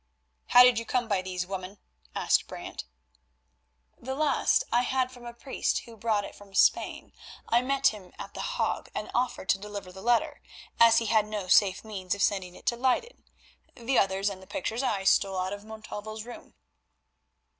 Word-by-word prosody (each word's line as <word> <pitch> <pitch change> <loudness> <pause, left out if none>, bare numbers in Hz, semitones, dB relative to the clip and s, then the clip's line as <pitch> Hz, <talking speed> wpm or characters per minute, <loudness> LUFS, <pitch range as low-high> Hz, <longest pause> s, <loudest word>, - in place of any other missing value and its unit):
"How 245 - +8
did 250 -2 +5
you - - -5
come 245 -1 0
by 200 -4 +1
these, 180 -1 -4
woman?" 190 +1 -6 0.4
asked - - +2
Brant. - - -7 1.1
"The 265 +2 -5
last 290 -2 +2
I 240 - +4
had 255 0 0
from 245 -1 -11
a 235 - -7
priest 260 +2 -1
who 230 - -12
brought 215 -2 0
it - - -9
from 200 -1 -15
Spain. - - +2 0.3
I 235 +1 +3
met 270 +1 -1
him 200 -4 -10
at - - -8
The - - -5
Hague, - - -2
and - - -4
offered 245 -6 -1
to 195 - +3
deliver 200 -2 -7
the 190 +1 -11
letter, 245 +7 +1 0.4
as 230 0 +7
he 230 - +2
had 215 -1 +2
no 210 -3 -4
safe 190 +1 +4
means 195 -3 -3
of 200 - -1
sending 185 -3 0
it - - -15
to 235 - +1
Leyden. 260 - -1 0.5
The 245 +2 +1
others 195 0 +1
and 190 -1 -9
the 190 - -14
pictures 225 +6 -3
I 215 -7 -1
stole 195 0 +3
out 185 +1 -2
of 205 +1 -8
Montalvo's 215 0 -7
room." 240 - -11
215 Hz, 190 wpm, -28 LUFS, 195-245 Hz, 1.1 s, How